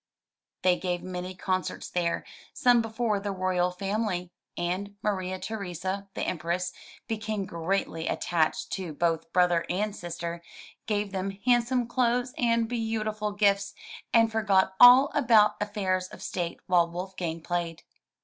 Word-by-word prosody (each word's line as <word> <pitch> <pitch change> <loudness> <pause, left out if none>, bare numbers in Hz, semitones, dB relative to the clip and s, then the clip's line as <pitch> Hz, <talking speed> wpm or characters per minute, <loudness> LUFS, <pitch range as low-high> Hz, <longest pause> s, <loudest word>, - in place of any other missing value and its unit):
They 180 -1 +4
gave 180 -1 -2
many 185 0 -5
concerts 185 0 -2
there, 170 -1 -1 0.3
some 245 -1 +5
before 225 -1 -1
the 200 0 -3
royal 185 -1 +1
family; 195 -1 -2 0.3
and 185 +4 -2
Maria 185 -3 -1
Theresa, 195 -1 -4
the - - -2
empress, 175 +1 -2 0.3
became 215 -3 -2
greatly 170 -1 -2
attached 165 -3 0
to 180 -5 -4
both 165 +1 -1
brother 175 -2 +3
and 205 +3 -1
sister, 170 -1 -5 0.5
gave 205 -2 -1
them 195 0 -3
handsome 245 0 +3
clothes 245 +1 +1
and 230 -1 +2
beau 225 -2 -1
tiful 210 -1 -2
gifts, 200 -1 +2 0.4
and 230 -1 +4
forgot 195 -4 +2
all 250 +3 +9
about 230 -8 +4
affairs 190 -3 -1
of - - -11
state 175 -2 -3
while 175 -2 +3
Wolfgang 175 -2 -4
played. 170 -1 -3
190 Hz, 135 wpm, -28 LUFS, 180-215 Hz, 0.5 s, all